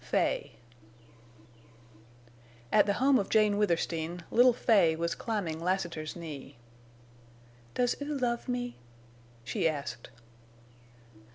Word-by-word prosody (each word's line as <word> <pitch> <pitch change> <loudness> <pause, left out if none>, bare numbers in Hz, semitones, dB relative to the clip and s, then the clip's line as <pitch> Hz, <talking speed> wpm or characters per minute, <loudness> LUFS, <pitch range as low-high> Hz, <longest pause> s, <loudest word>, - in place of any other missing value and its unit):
FAY - - 0 2.2
At - - +5
the 200 - +2
home 265 +4 +4
of 200 - -3
Jane 210 -2 +3
Withersteen 170 -3 -1
Little 245 +2 +6
Fay 200 -9 +3
was 170 +1 -1
climbing 195 -9 -3
Lassiter's 170 -3 -2
knee. 155 -8 -8 1.2
"Does 245 -1 +1
oo 290 0 -2
love 240 -2 -1
me?" 245 0 -3 0.7
she 125 +6 0
asked. 145 -3 -5
195 Hz, 100 wpm, -30 LUFS, 165-240 Hz, 2.2 s, Little